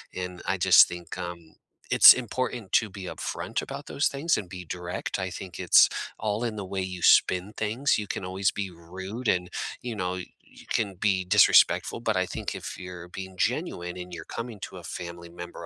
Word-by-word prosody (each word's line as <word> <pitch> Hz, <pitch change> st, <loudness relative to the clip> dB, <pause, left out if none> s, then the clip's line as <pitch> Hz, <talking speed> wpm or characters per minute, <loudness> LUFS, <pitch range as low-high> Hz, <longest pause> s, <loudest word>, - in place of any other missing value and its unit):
and 90 Hz, -1 st, -5 dB
I 95 Hz, -, +1 dB
just 90 Hz, 0 st, +7 dB
think, 85 Hz, 0 st, -8 dB
um, 85 Hz, -2 st, -7 dB, 0.4 s
it's -, -, +11 dB
important 125 Hz, -3 st, -4 dB
to 110 Hz, -3 st, +3 dB
be 95 Hz, -1 st, -9 dB
upfront -, -, -4 dB
about -, -, -8 dB
those 145 Hz, -, +1 dB
things 145 Hz, +4 st, 0 dB
and 100 Hz, -, -5 dB
be 90 Hz, 0 st, -8 dB
direct. 90 Hz, +3 st, -4 dB
I 95 Hz, -, -2 dB
think 90 Hz, 0 st, -8 dB
it's 90 Hz, -3 st, +6 dB, 0.3 s
all 110 Hz, +2 st, -1 dB
in 110 Hz, -2 st, -3 dB
the 100 Hz, -, -5 dB
way 95 Hz, 0 st, -3 dB
you 90 Hz, -1 st, -5 dB
spin 95 Hz, +5 st, +4 dB
things. 115 Hz, +6 st, +1 dB
You 105 Hz, -, -4 dB
can -, -, -4 dB
always 95 Hz, +2 st, 0 dB
be 100 Hz, -2 st, -4 dB
rude 95 Hz, +8 st, -7 dB
and, 90 Hz, -1 st, +1 dB, 0.3 s
you 120 Hz, -1 st, -4 dB
know, 90 Hz, -1 st, -2 dB, 0.4 s
you -, -, -15 dB
can 100 Hz, -4 st, -1 dB
be 95 Hz, 0 st, +1 dB
disrespectful. 90 Hz, +5 st, +5 dB
But 110 Hz, -5 st, 0 dB
I 95 Hz, -, +2 dB
think -, -, -5 dB
if -, -, -7 dB
you're 90 Hz, -1 st, -8 dB
being 95 Hz, +1 st, -8 dB
genuine 90 Hz, 0 st, -1 dB
and 90 Hz, 0 st, -8 dB
you're 85 Hz, -2 st, -7 dB
coming 115 Hz, -3 st, -6 dB
to -, -, -7 dB
a 85 Hz, -, -10 dB
family 85 Hz, 0 st, -7 dB
member 85 Hz, 0 st, -9 dB
95 Hz, 200 wpm, -27 LUFS, 90-105 Hz, 0.4 s, it's